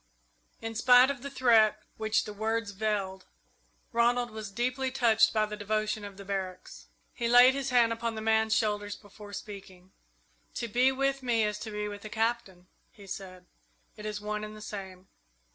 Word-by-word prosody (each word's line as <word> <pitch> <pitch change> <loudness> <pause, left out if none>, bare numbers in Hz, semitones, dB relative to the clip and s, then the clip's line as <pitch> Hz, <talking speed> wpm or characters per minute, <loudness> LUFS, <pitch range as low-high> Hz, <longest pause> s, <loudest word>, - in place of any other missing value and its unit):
In 225 0 -4
spite 250 +3 +6
of 270 -3 -7
the 280 - -6
threat 225 -5 +4
which 220 0 +1
the 210 - -7
words 220 0 -2
veiled, 195 -2 -2 0.6
Ronald 240 0 +2
was 215 -1 -6
deeply 255 +5 -1
touched 230 -4 +4
by 215 -1 +2
the 210 0 -6
devotion 215 +1 -2
of 200 -1 -9
the 200 - -10
barracks. 190 -2 -5 0.3
He 235 - -2
laid 245 +2 +7
his 275 0 -2
hand 240 -2 +4
on 230 0 -3
the - - -4
man's 220 0 +2
shoulders 205 -2 0
before 205 0 -13
speaking. 190 -3 -10 0.6
"To 235 - -3
be 250 +4 +3
with 275 +1 0
me 235 -3 +1
is 210 0 -1
to 220 - -6
be 210 0 -3
with 205 -1 -7
the 215 - -8
Captain," 220 -5 -2 0.3
he 205 - -15
said. 185 -1 -8 0.5
"It 210 - -7
is 210 -1 -4
one 210 0 -4
and 215 0 -7
the - - -11
same. 190 -3 -8
215 Hz, 180 wpm, -29 LUFS, 205-235 Hz, 0.6 s, laid